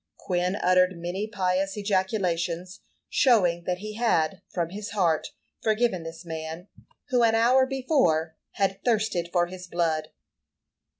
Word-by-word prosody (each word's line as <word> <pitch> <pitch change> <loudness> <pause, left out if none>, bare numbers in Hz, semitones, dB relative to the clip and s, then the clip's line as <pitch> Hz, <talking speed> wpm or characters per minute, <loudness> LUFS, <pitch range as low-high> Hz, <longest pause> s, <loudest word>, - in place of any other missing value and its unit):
Quin 180 +1 -1
uttered 185 -2 +3
many 175 +5 -3
pious 195 -1 -1
ejaculations, 185 -3 -1 0.3
showing 180 -10 +3
that 180 -1 -1
he 215 +2 -7
had, 195 -6 +1
from 170 -2 -1
his 205 +2 -6
heart, 165 -5 +2 0.3
forgiven 220 -4 +1
this 165 +2 -9
man, 160 +2 -6 0.4
who, 250 -3 +3
an 225 -1 +4
hour 255 +3 +4
before, 250 - +1 0.2
had 195 -1 -1
thirsted 215 -7 0
for 175 -1 +3
his 185 +1 -9
blood. 160 -3 0
185 Hz, 130 wpm, -26 LUFS, 170-215 Hz, 0.4 s, an